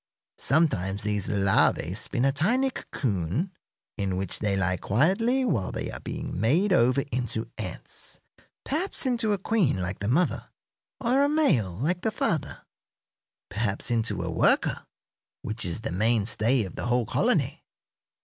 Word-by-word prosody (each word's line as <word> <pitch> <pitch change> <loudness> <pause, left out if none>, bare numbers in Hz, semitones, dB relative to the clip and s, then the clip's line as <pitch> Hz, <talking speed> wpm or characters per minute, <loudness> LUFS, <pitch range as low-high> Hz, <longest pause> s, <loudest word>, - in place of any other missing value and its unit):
Sometimes 105 - +1
these 105 -1 -1
larvæ 100 -1 +2
spin 125 - 0
a 135 - +4
tiny 240 - +1
cocoon, 115 - -2 0.5
in 95 -3 -1
which 95 -1 -2
they 100 -2 0
lie 95 -1 +1
quietly 195 - +2
while 110 - 0
they - - -4
are - - -7
being - - -5
made 170 - +3
over 130 -2 +3
into 115 -2 -2
ants 95 -5 -7 0.4
perhaps 325 +3 -2
into 235 -4 +1
a 205 - +2
queen, 195 - +1
like 90 +1 -3
the 100 - -3
mother, 165 +10 +1 0.5
or 255 +3 +2
a 285 - +3
male, 135 - +2
like 170 - -1
the 220 - +1
father; 170 -7 -2 0.9
perhaps 100 +3 -1
into 110 -5 +1
a 85 - -3
worker, - - +2 0.6
which 110 +2 -3
is 90 +3 -2
the - - -4
mainstay 110 +4 +1
of 95 - -8
the - - -4
whole 120 -1 +2
colony. - - 0
120 Hz, 150 wpm, -27 LUFS, -, 0.9 s, a